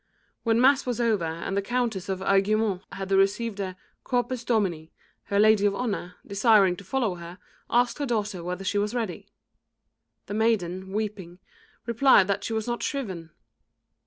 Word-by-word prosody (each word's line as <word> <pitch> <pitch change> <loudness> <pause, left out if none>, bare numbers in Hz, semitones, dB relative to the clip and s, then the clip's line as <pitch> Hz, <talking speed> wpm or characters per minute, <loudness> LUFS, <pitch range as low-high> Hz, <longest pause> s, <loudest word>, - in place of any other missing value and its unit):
When 230 0 +2
mass 265 +1 +4
was 245 -1 -1
over 220 -7 +1
and 165 +4 -4
the 200 - +1
Countess 225 -3 -2
of 190 -1 -2
Aiguemont 195 0 +2
had 195 0 -6
received 200 +3 +2
the 185 -2 -3 0.3
"Corpus 245 -1 -1
Domini," 190 -9 -1 0.3
her 200 - -1
lady 210 -1 +5
of 200 - -1
honour, 200 -6 -3
desiring 200 -2 +4
to 200 - -10
follow 230 0 -1
her, 170 +1 -9 0.3
asked 240 +2 +2
her 285 - -1
daughter 210 -6 -2
whether 180 +2 -4
she 205 +2 0
was 210 +3 -1
ready. 225 -7 -4 1.0
The - - -6
maiden, 190 -4 0
weeping, 200 -4 -4 0.5
replied 235 -4 +5
that 200 0 0
she - - -4
was 220 -1 -1
not 240 0 -3
shriven. 190 - -4
205 Hz, 160 wpm, -26 LUFS, 190-230 Hz, 1.0 s, lady